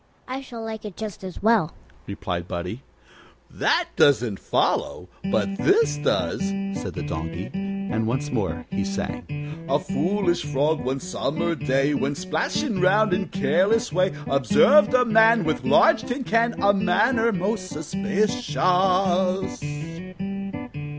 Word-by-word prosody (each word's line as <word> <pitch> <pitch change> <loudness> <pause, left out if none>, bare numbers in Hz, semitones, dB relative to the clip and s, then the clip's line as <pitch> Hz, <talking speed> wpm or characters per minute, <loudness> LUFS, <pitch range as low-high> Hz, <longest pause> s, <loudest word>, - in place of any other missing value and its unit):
I 260 +1 -4
shall 235 -4 -8
like 220 -1 -6
it 205 -4 -8
just 215 -3 -6
as 185 0 -8
well," 215 -8 +3 0.3
replied 90 -3 -4
Buddie. 90 +7 -5 0.7
"That - - +1
doesn't 120 -7 +3
follow, 90 - -1 0.2
but 195 0 0
this 145 -1 +3
does," 145 - 0 0.3
said - - -5
the 150 - -4
Donkey, 85 - -5
and 195 - -3
once 135 +5 -2
more 95 -9 -2
he 195 +1 -1
sang: 150 -5 -5
"A 140 - +3
foolish 185 +1 0
Frog, 145 +2 0
one 130 +2 -2
summer 170 -1 -2
day, 140 -2 +1
While 145 - -1
splashing 185 - -2
round 200 +2 +4
in 190 0 0
careless 200 +5 +1
way, 185 +2 +2 0.2
Observed 200 - +5
a 250 -1 +4
man 225 -1 +5
With 155 -1 -1
large 320 -1 +5
tin 255 +1 -4
can, 230 0 +1
And 200 0 +3
manner 225 +5 +3
most 190 0 -2
suspicious. 195 - -2
185 Hz, 130 wpm, -24 LUFS, 145-210 Hz, 0.7 s, Observed